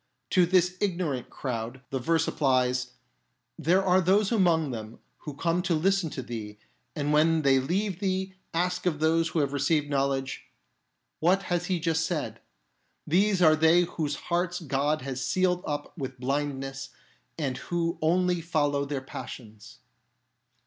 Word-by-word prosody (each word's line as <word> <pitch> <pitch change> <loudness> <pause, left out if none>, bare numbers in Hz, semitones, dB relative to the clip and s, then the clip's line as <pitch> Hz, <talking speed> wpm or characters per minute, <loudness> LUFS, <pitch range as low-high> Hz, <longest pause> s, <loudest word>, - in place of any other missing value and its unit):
To 180 -3 +4
this 180 0 +2
ignorant 170 -10 -1
crowd 120 0 -5
the 135 - -1
verse 165 +5 +1
applies: 125 -2 +1 0.3
" - - -47 0.3
There 185 +4 +2
are 185 0 +4
those 195 +3 +3
among 170 - +3
them 110 -1 -7 0.2
who 150 - -8
come 170 +4 0
to 180 -2 0
listen 190 +1 +1
to 130 - -6
thee, 110 -3 -7 0.4
and 145 0 -1
when 160 +1 +3
they 135 -1 +5
leave 185 +7 -1
thee, 190 -1 -1 0.2
ask 180 +2 -1
of 155 -4 0
those 165 +1 +2
who 165 - -1
have 140 -1 -1
received 145 +1 +1
knowledge, 135 -1 -1 0.4
' - - -51
What 185 +4 +3
has 175 -1 -1
he 185 -2 0
just 160 -1 0
said? 150 -10 -3 0.3
' - - -46
These 195 -1 +3
are 155 -1 +7
they 160 +2 +5
whose 155 -4 -2
hearts 175 0 -1
God 145 -1 -1
has 135 -1 -4
sealed 180 -1 +1
up 145 0 -4
with 130 -5 -6
blindness 135 0 -3 0.5
and 135 -5 -2
who 170 +2 -2
only 175 +2 +2
follow 145 -4 0
their 140 -1 -3
passions." 115 -3 -10
155 Hz, 160 wpm, -27 LUFS, 135-180 Hz, 0.5 s, are